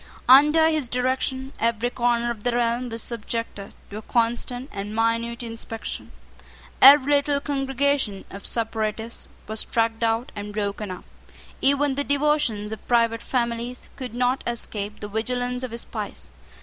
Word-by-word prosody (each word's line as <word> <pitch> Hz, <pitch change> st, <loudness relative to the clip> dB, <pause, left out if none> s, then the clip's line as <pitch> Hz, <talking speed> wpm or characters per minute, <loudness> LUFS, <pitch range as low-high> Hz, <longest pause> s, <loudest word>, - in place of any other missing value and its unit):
Under 300 Hz, +5 st, +7 dB
his 310 Hz, -6 st, 0 dB
direction 260 Hz, +2 st, -1 dB
every 230 Hz, +1 st, +1 dB
corner 240 Hz, -1 st, +1 dB
of 225 Hz, -3 st, -6 dB
the 245 Hz, +2 st, 0 dB
realm 240 Hz, +1 st, 0 dB
was 230 Hz, -1 st, -3 dB
subjected 230 Hz, -3 st, -5 dB, 0.2 s
to 205 Hz, -, -5 dB
a -, -, -5 dB
constant 240 Hz, +3 st, -1 dB
and 205 Hz, +2 st, -5 dB
minute 230 Hz, +1 st, 0 dB
inspection. 225 Hz, -1 st, -6 dB, 0.7 s
Every 280 Hz, +1 st, +9 dB
little 285 Hz, 0 st, +2 dB
congregation 270 Hz, -6 st, -1 dB
of 200 Hz, -, -9 dB
separatists 225 Hz, 0 st, -3 dB, 0.2 s
was 220 Hz, 0 st, -2 dB
tracked 225 Hz, 0 st, 0 dB
out 230 Hz, +1 st, 0 dB
and 205 Hz, 0 st, -6 dB
broken 205 Hz, 0 st, -2 dB
up. 185 Hz, -1 st, -7 dB, 0.6 s
Even 280 Hz, +1 st, +3 dB
the 285 Hz, +2 st, -1 dB
devotions 285 Hz, -8 st, +1 dB
of 220 Hz, -, -8 dB
private 230 Hz, -1 st, +3 dB
families 240 Hz, 0 st, -2 dB
could 250 Hz, -3 st, -6 dB
not 250 Hz, +2 st, +1 dB
escape 215 Hz, -3 st, -4 dB
the 210 Hz, -, -4 dB
vigilance 245 Hz, +3 st, -2 dB
of 255 Hz, -, -3 dB
his 235 Hz, +1 st, -2 dB
spies. -, -, -6 dB
235 Hz, 150 wpm, -24 LUFS, 225-260 Hz, 0.7 s, Every